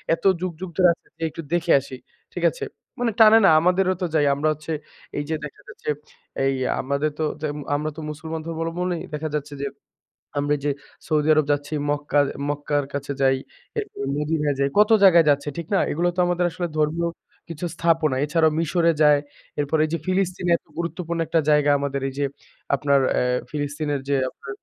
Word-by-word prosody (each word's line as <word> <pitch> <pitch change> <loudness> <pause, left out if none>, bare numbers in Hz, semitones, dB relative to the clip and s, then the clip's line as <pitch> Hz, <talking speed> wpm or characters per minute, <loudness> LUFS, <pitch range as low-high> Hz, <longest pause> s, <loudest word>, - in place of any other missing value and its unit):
"এত - - -21 0.2
যুগযুগ 180 0 -4
ধরে 180 -2 +6
আছে, - - -22
যেয়ে 165 - -1
একটু 165 - -6
দেখে 175 -1 +1
আসি।" 135 -1 -9 0.4
ঠিক - - -4
আছে? 475 -4 -8 0.4
মানে 240 -2 +1
টানে 220 0 +9
না? - - +8
আমাদেরও 185 +2 +2
তো - - +1
যাই। 150 -2 +4
আমরা 150 +2 0
হচ্ছে 155 +2 -8 0.5
এই 145 - -1
যে, 160 - 0
দেখা 150 - -11
যাচ্ছে, - - -7 0.6
এই 135 - +2 0.3
আমাদের 140 +3 -1
তো 155 - +1 0.2
জেম 150 -1 -3 0.2
আমরা 150 +1 -1
তো 160 - -5
মুসলমান 160 +1 -6
ধর্মাবলম্বনেই, 165 +2 -2
দেখা 155 +1 -3
যাচ্ছে 145 0 -7
যে, 140 - 0 0.7
আমরা 145 +1 +1
ওইযে 145 +1 -2 0.4
সৌদি 150 0 +1
আরব 155 - +3
যাচ্ছি, 145 +1 -2 0.2
মক্কা 145 0 +1 0.3
মক্কার 145 0 -1
কাছে 140 0 -3
যাই, 135 0 +4 0.4
এরপর 425 - -5 0.2
মদিনা 150 0 0
যাই, 140 0 +2
কত 210 +1 +5
জায়গায় 170 -4 +7
যাচ্ছি। 145 +1 +1
ঠিক 170 - -4
না? - - +4
এইগুলাও 175 +3 +1
তো 180 - +1
আমাদের 175 0 +1
আসলে 175 +1 -3
ধর্মীয় 160 +3 +1 0.4
কিছু 165 +1 -6
স্থাপনা। 165 -5 +2
এছাড়াও 160 +1 +3
মিশরে 165 +1 +2
যায়। 150 -1 +6 0.4
এরপরে 145 +2 +1
এই 155 - -9
যে, 170 - 0
ফিলিস্তিনে 185 -1 0
এত - - -20
গুরুত্বপূর্ণ 170 0 -3
একটা 165 - +2
জায়গা, 150 -1 +4
আমাদের 140 -1 -2
এইযে 140 +2 -2 0.5
আপনার 140 -1 +3
অ্যা - - +1 0.3
ফিলিস্তিনের 145 -1 -2
যে, 140 - +3
আপনার 135 - -9
155 Hz, 185 wpm, -23 LUFS, 145-170 Hz, 0.7 s, টানে